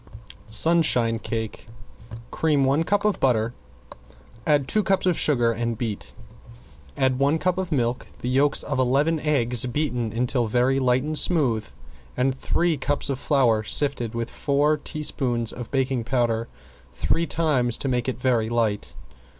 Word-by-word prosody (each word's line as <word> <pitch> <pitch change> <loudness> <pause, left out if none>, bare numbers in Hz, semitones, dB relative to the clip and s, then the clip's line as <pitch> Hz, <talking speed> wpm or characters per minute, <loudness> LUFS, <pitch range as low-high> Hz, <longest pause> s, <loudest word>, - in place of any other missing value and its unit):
~SUNSHINE 120 -4 +3
CAKE~ 110 -1 -5 0.6
Cream 150 -3 +1
one 140 +4 +2
cup 205 +4 0
of 210 - +1
butter, 115 -3 +1 0.9
add 145 -3 +2
two 215 - +1
cups 195 -2 0
of 180 -2 +2
sugar 120 -7 +2
and 115 0 -3
beat, 110 -4 -5 0.8
add 130 -2 +1
one 140 +3 +2
cup 185 +2 -1
of 185 -2 -4
milk, 125 -4 -1
the - - -6
yolks 135 +3 +2
of 135 -2 -3
eleven 140 +6 +2
eggs 125 -6 +1
beaten 125 -4 -2
until 120 +1 0
very 125 +4 +1
light 130 0 +2
and 155 0 0
smooth, 125 - +2 0.5
and 130 +1 +1
three 165 +4 0
cups 140 +1 -1
of 135 - -4
flour 125 -8 +2
sifted 120 -2 0
with 115 0 -4
four 145 +2 +1
teaspoons 130 -6 -1
of 120 -3 -8
baking 130 -3 -1
powder 120 -2 0 0.5
three 120 - -1
times 135 -8 +1
to - - -3
make 125 -1 0
it 130 - -5
very 120 -4 +1
light. 115 -3 -1
130 Hz, 150 wpm, -24 LUFS, 120-150 Hz, 0.9 s, ~SUNSHINE